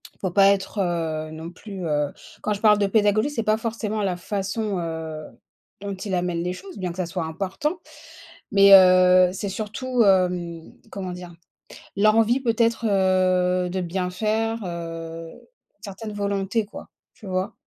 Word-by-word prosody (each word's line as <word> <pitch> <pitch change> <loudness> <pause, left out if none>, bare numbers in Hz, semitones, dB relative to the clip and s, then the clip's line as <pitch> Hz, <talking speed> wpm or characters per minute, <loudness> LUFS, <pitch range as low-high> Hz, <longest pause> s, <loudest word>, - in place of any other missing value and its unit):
Il - - -34
faut 185 -3 -2
pas 195 +1 +5
être, 200 +1 -1
heu, 160 -3 -2
non 160 +2 -8
plus, 190 -1 -8
heu 150 -1 0 0.3
quand 210 - -2
je 200 - -5
parle 210 -1 +5
de 200 - +2
pédagogie, 215 +4 +2
c'est 230 -6 -3
pas 215 +1 +2
forcément 220 -2 -3
la 180 -2 -1
façon, 200 +1 -3
heu, 160 -2 -5 0.6
dont 200 0 -5
il 190 0 -4
amène 175 -1 -1
les 180 - -2
choses, 375 - -10
bien 180 -2 -3
que 175 - -11
ça 185 - -1
soit 175 0 -4
important, 195 - -3 0.7
mais, 200 0 +6
heu, 185 -1 +7
c'est 200 +1 -4
surtout, 225 +5 -2
hem, 180 -4 +1 0.2
comment 185 -2 -5
dire, 180 -1 -9 0.7
l'envie 225 +4 +4
peut-être 230 -2 +1
heu 185 -2 +2
de 185 +1 -2
bien 180 +1 -2
faire, 220 +3 -1
heu, 165 -1 -6 0.5
certaines 210 +1 -7
volontés, 200 +1 -1
quoi, - - -11 0.2
tu 215 -6 -13
vois? 185 +1 -2
190 Hz, 165 wpm, -23 LUFS, 180-210 Hz, 0.7 s, heu